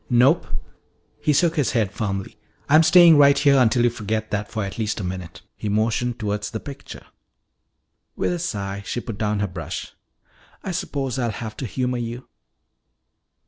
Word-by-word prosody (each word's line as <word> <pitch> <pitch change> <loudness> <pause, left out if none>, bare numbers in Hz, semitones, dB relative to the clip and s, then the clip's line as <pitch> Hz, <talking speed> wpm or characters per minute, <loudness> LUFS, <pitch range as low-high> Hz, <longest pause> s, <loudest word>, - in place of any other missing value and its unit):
"Nope!" 130 +7 +4 0.7
He 150 - +1
shook 165 +3 +2
his 145 - +1
head 110 -5 +1
firmly. 100 -2 -4 0.3
"I'm 155 +2 +6
staying 170 -2 +7
right 140 0 +6
here 140 -1 +4
until 120 -1 +4
you 120 - +3
forget 110 -1 -3
that 105 0 -2
for 110 - -3
at 95 +3 -7
least 110 0 -1
a - - -4
minute." 90 -1 -6
He 105 - -4
motioned 115 +3 0
toward 105 -2 -2
the 110 +2 -4
picture. 140 +1 -10 1.1
With - - 0
a 175 - -3
sigh 100 - -3
she 120 - -3
put 115 -4 -7
down 105 -1 0
her 105 - 0
brush. 85 -4 -6 0.7
"I 190 - -3
suppose 135 -7 -3
I'll 120 -2 0
have 110 0 -6
to 130 - -4
humor 125 +2 -2
you." 120 +2 -6
115 Hz, 175 wpm, -23 LUFS, 105-140 Hz, 1.1 s, staying